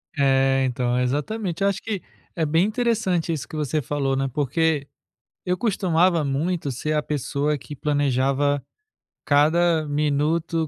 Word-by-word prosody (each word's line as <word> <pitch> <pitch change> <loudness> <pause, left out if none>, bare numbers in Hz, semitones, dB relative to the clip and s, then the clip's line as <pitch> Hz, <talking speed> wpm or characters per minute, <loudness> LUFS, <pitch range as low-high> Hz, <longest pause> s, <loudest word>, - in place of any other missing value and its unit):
É, 135 -1 +3
então, 125 0 0
exatamente. 165 - -2
Eu 200 - +4
acho 195 -1 -3
que 210 -5 -4 0.3
é 165 - 0
bem 165 +4 +3
interessante 215 -7 0
isso 150 - -5
que - - -9
você 150 0 -1
falou, 135 0 -1
né, 135 0 0
porque 145 +1 0 0.6
eu 180 0 0
costumava 180 -5 +2
muito 145 +2 -1
ser 155 +5 -2
a 150 - +1
pessoa 145 +1 -1
que 145 - -9
planejava 140 0 +1 0.6
cada 155 +2 +3
minuto, 150 +3 0
150 Hz, 140 wpm, -23 LUFS, 140-170 Hz, 0.6 s, Eu